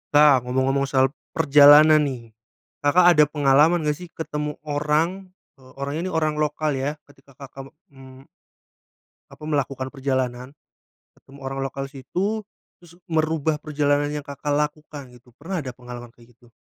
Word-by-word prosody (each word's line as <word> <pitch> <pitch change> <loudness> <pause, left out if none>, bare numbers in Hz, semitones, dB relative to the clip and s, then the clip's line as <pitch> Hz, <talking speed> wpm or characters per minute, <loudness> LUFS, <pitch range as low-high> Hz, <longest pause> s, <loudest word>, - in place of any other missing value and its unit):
Nah, 145 -3 +6
ngomong-ngomong 130 +2 0
soal 135 -1 +2 0.2
perjalanan 150 0 +7
nih. 120 -4 -8 0.5
Kakak 160 +5 +3
ada 150 - +6
pengalaman 150 +3 +3
nggak 150 -1 -1
sih 180 - -9
ketemu 150 -3 -5
orang, 155 +6 -1 0.3
eee, 130 -1 -18
orang 140 +1 -4
ini 180 - -3
orang 155 -2 0
lokal 150 0 -1
ya 140 +3 -2
ketika 140 -1 -22
Kakak, 135 0 -11 0.2
mmm 135 -1 -15 1.0
apa - - -15
melakukan 140 -3 -2
perjalanan, 130 -1 -3 0.6
ketemu 140 +1 -17
orang 135 0 -5
lokal 135 0 -5
situ 185 - -4 0.3
terus 175 -1 -18 0.2
merubah 155 -1 0
perjalanan 145 -1 0
yang 150 -1 -5
Kakak 145 +1 -4
lakukan 150 -2 -4
gitu. 125 -1 -20
Pernah 180 +4 -5
ada 125 -1 -7
pengalaman 120 -1 -11
kayak 120 0 -20
gitu? 120 -1 -23
145 Hz, 145 wpm, -22 LUFS, 135-155 Hz, 1.0 s, perjalanan